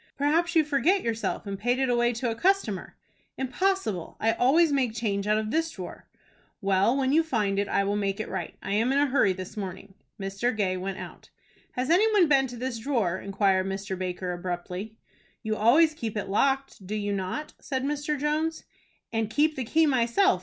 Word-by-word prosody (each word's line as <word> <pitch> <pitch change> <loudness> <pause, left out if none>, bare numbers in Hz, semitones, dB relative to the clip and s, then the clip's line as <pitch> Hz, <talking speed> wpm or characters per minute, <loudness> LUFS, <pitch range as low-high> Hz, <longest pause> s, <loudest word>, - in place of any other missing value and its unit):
"Perhaps 325 +5 +1
you 320 - +6
forget 300 +7 +2
yourself, 230 -1 -2
and 200 -1 -5
paid 245 +4 +1
it 265 0 +1
away 240 -1 +2
to 235 0 -2
a - - -3
customer." 355 - 0 0.4
"Impossible; 265 - -1
I 225 - +3
always 300 +8 +4
make 255 -5 +1
change 205 -3 -1
out 210 0 +3
of 215 0 -2
this 325 +3 +1
drawer." 185 - -9 0.5
"Well, 200 +5 +2
when 265 -1 +1
you 315 +3 +5
find 210 -11 0
it, 200 - 0
I 200 - +2
will 200 +1 0
make 200 -1 -1
it 215 - -3
right. - - -5
I - - -4
am 225 +5 +2
in 275 - +2
a 285 - +4
hurry 265 -8 +3
this 185 0 -6
morning." 195 -1 -6 0.3
Mr. 195 +4 -2
Gay 190 -3 +1
went 190 +1 -4
out. - - -10 0.4
"Has 255 +4 -1
any 425 +6 +4
one 380 -5 +5
been 270 -2 +4
to 245 -1 -9
this 250 -1 -3
drawer?" 220 -8 0
inquired 195 -1 +1
Mr. 195 0 -3
Baker, 180 0 -3
abruptly. 180 +4 -5 0.5
"You 220 0 -1
always 290 +10 +5
keep 225 -8 -4
it 205 - -3
locked, 270 -2 0
do 210 - -3
you 205 -1 -1
not?" 200 +11 -4
said 260 -2 -3
Mr. 295 +1 -1
Jones. 310 +2 -1 0.5
"And 225 -1 0
keep 300 +6 +2
the 260 - -2
key 320 +7 +3
myself. 270 +8 +3
230 Hz, 200 wpm, -27 LUFS, 200-285 Hz, 0.5 s, you